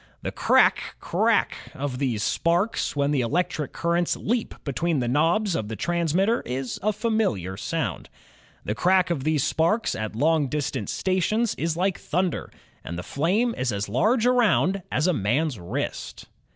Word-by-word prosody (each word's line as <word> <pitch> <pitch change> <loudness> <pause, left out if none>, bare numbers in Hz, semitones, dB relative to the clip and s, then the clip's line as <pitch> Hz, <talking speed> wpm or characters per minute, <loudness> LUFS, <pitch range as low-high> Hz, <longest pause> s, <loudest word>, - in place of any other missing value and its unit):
The - - -2
cr - - 0
a - - +7
ck, - - -9
cr - - 0
a - - +4
ck - - -11 0.2
of 135 -2 -4
the 130 -5 0
sparks 170 - 0
when 140 0 +1
the 140 -3 +2
electric 155 +3 -1
currents 170 0 0
leap 235 +1 -2
between 160 +3 -1
the 120 - -1
knobs 165 - +2
of 105 - -2
the 110 - -5
trans 170 - -1
mitter 200 +6 +2
is 130 0 -4
a 215 - +2
familiar 210 - -1
sound. - - -3 0.6
The 105 - -1
crack 185 - +2
of 145 -5 -2
these 155 -3 +2
spsu 170 +8 +1
ks - - -1
at 110 0 -4
long 155 +3 +2
distance 135 -5 -2
stations 195 +5 0
is 165 0 -2
like 190 +1 0
thunder, 180 +2 -2 0.3
and 85 - -6
the 90 - -5
flame 195 - +1
is 125 -1 -1
as 100 0 -2
large 215 - +2
around 210 -6 +3
as 150 - +1
a 180 - +3
man's 130 - 0
wrist. 85 - -5
165 Hz, 180 wpm, -25 LUFS, 130-190 Hz, 0.6 s, a